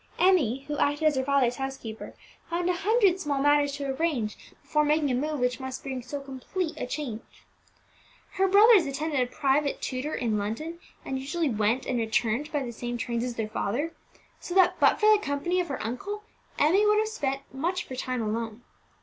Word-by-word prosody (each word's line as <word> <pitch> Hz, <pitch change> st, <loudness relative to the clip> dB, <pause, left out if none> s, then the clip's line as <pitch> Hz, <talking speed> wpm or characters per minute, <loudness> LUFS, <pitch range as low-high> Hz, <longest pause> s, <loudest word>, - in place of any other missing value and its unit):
Emmie, 295 Hz, -, +3 dB
who 295 Hz, +1 st, -4 dB
acted 290 Hz, +2 st, +1 dB
as 305 Hz, -2 st, +4 dB
her 260 Hz, -, +1 dB
father's 260 Hz, -3 st, +2 dB
housekeeper, 270 Hz, -5 st, -6 dB, 0.3 s
found 345 Hz, +1 st, -1 dB
a 360 Hz, -, +3 dB
hundred 390 Hz, 0 st, +3 dB
small 290 Hz, -5 st, -1 dB
matters 290 Hz, 0 st, +3 dB
to 285 Hz, 0 st, -4 dB
arrange 270 Hz, -6 st, -1 dB, 0.3 s
before 300 Hz, 0 st, +1 dB
making 300 Hz, -1 st, +2 dB
a -, -, +1 dB
move 295 Hz, +4 st, -1 dB
which 250 Hz, +1 st, 0 dB
must 260 Hz, 0 st, -6 dB
bring 265 Hz, -2 st, -4 dB
so 270 Hz, +4 st, -5 dB
complete 280 Hz, +6 st, -4 dB
a 310 Hz, -, -4 dB
change. 255 Hz, -6 st, -4 dB, 1.1 s
Her 385 Hz, 0 st, +2 dB
brothers 405 Hz, -3 st, +7 dB
attended 290 Hz, +1 st, -2 dB
a 250 Hz, -, +2 dB
private 280 Hz, +3 st, +1 dB
tutor 260 Hz, +4 st, -3 dB
in 220 Hz, -4 st, 0 dB
London, 305 Hz, +12 st, -4 dB, 0.3 s
and 265 Hz, -, -2 dB
usually 300 Hz, +4 st, -1 dB
went 220 Hz, +4 st, +1 dB
and 245 Hz, -, -1 dB
returned 230 Hz, +5 st, 0 dB
by 290 Hz, -2 st, -1 dB
the 240 Hz, -, -5 dB
same 240 Hz, +1 st, -4 dB
trains 235 Hz, -1 st, -2 dB
as 245 Hz, -1 st, -3 dB
their 220 Hz, -2 st, -2 dB
father; 270 Hz, +10 st, -2 dB, 0.5 s
so 355 Hz, -, -6 dB
that, 375 Hz, -2 st, +4 dB
but -, -, +4 dB
for 430 Hz, 0 st, +6 dB
the 415 Hz, -, -2 dB
company 315 Hz, +6 st, 0 dB
of 355 Hz, -, -1 dB
her 275 Hz, -, -4 dB
uncle, 400 Hz, -, -4 dB, 0.3 s
Emmie 375 Hz, +8 st, +4 dB
would 420 Hz, 0 st, +4 dB
have 435 Hz, 0 st, +2 dB
spent 275 Hz, -11 st, -2 dB
much 345 Hz, +7 st, -1 dB
of -, -, -20 dB
her 260 Hz, -, -5 dB
time 255 Hz, -2 st, -2 dB
alone. 225 Hz, +1 st, -3 dB
280 Hz, 200 wpm, -27 LUFS, 250-330 Hz, 1.1 s, brothers